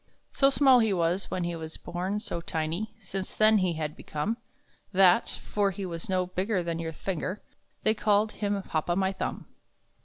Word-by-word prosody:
So 275 Hz, -, +5 dB
small 270 Hz, -2 st, +6 dB
he 220 Hz, -3 st, +3 dB
was 175 Hz, +2 st, 0 dB
when 180 Hz, -, -2 dB
he 170 Hz, 0 st, -2 dB
was 160 Hz, -1 st, -7 dB
born, 180 Hz, +4 st, -3 dB
so 170 Hz, -5 st, -4 dB
tiny 165 Hz, +5 st, -3 dB
Since 195 Hz, -2 st, -5 dB
then 215 Hz, 0 st, +6 dB
he 185 Hz, -2 st, +1 dB
had 155 Hz, -2 st, -3 dB
become, 180 Hz, +10 st, -3 dB, 0.5 s
That 190 Hz, +2 st, +5 dB
for 205 Hz, -1 st, -1 dB
he 195 Hz, 0 st, -5 dB
was 170 Hz, -1 st, -6 dB
no 185 Hz, -1 st, +2 dB
bigger 185 Hz, +1 st, -1 dB
than 170 Hz, -1 st, -2 dB
your 165 Hz, -1 st, -3 dB
finger 185 Hz, +4 st, -3 dB, 0.4 s
They 215 Hz, -, +4 dB
called 210 Hz, 0 st, +2 dB
him 205 Hz, -1 st, -1 dB
Hop 155 Hz, -1 st, -2 dB
o' 175 Hz, -, +3 dB
my 190 Hz, 0 st, +2 dB
Thumb. -, -, -4 dB
185 Hz, 185 wpm, -28 LUFS, 170-210 Hz, 0.5 s, small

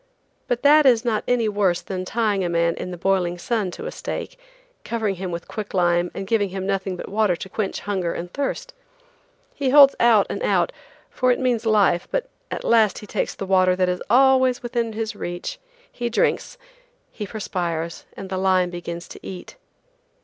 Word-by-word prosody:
But 245 Hz, 0 st, -1 dB
that 295 Hz, 0 st, +6 dB
is 240 Hz, -2 st, +4 dB
not 220 Hz, -3 st, 0 dB
any 240 Hz, -2 st, +2 dB
worse 200 Hz, -4 st, +1 dB
than 185 Hz, -1 st, -4 dB
tying 210 Hz, -2 st, 0 dB
a 175 Hz, -, -1 dB
man 170 Hz, 0 st, +2 dB
in -, -, -6 dB
the 180 Hz, -, -6 dB
boiling 180 Hz, -1 st, 0 dB
sun 210 Hz, +1 st, -1 dB
to -, -, -7 dB
a -, -, -4 dB
stake, -, -, -6 dB, 0.4 s
covering 220 Hz, -4 st, -1 dB
him 185 Hz, 0 st, -4 dB
with 170 Hz, -1 st, -6 dB
quick 210 Hz, -3 st, -6 dB
lime 175 Hz, -1 st, +2 dB
and 195 Hz, -, -4 dB
giving 205 Hz, -1 st, +1 dB
him 190 Hz, 0 st, -5 dB
nothing 195 Hz, -1 st, -1 dB
but -, -, -7 dB
water 205 Hz, -3 st, +1 dB
to 190 Hz, -, -8 dB
quench 205 Hz, -1 st, -3 dB
hunger 190 Hz, -4 st, -2 dB
and 175 Hz, +1 st, -6 dB
thirst. 280 Hz, -1 st, -3 dB, 0.8 s
He 275 Hz, -3 st, -1 dB
holds 275 Hz, 0 st, +8 dB
out 230 Hz, -4 st, +5 dB
and -, -, -5 dB
out, -, -, +2 dB, 0.4 s
for 255 Hz, 0 st, +2 dB
it 245 Hz, -, +1 dB
means 245 Hz, -3 st, 0 dB
life, 200 Hz, -5 st, +3 dB
but -, -, -2 dB, 0.2 s
at -, -, -5 dB
last 225 Hz, -3 st, +3 dB
he -, -, -8 dB
takes -, -, -2 dB
the 195 Hz, -, -5 dB
water 185 Hz, -1 st, +3 dB
that 185 Hz, 0 st, +1 dB
is 180 Hz, 0 st, -2 dB
always 260 Hz, 0 st, +4 dB
within 235 Hz, -2 st, -2 dB
his 220 Hz, 0 st, -3 dB
reach. 175 Hz, -, -5 dB, 0.3 s
He 240 Hz, -1 st, -3 dB
drinks, 235 Hz, -, 0 dB, 0.5 s
he 210 Hz, -3 st, -6 dB
perspires, 170 Hz, -5 st, -4 dB
and 195 Hz, -, -6 dB
the 190 Hz, -, -1 dB
lime 185 Hz, -2 st, +2 dB
begins 170 Hz, 0 st, -6 dB
to -, -, -10 dB
eat. 185 Hz, -2 st, -8 dB
200 Hz, 195 wpm, -22 LUFS, 180-235 Hz, 0.8 s, holds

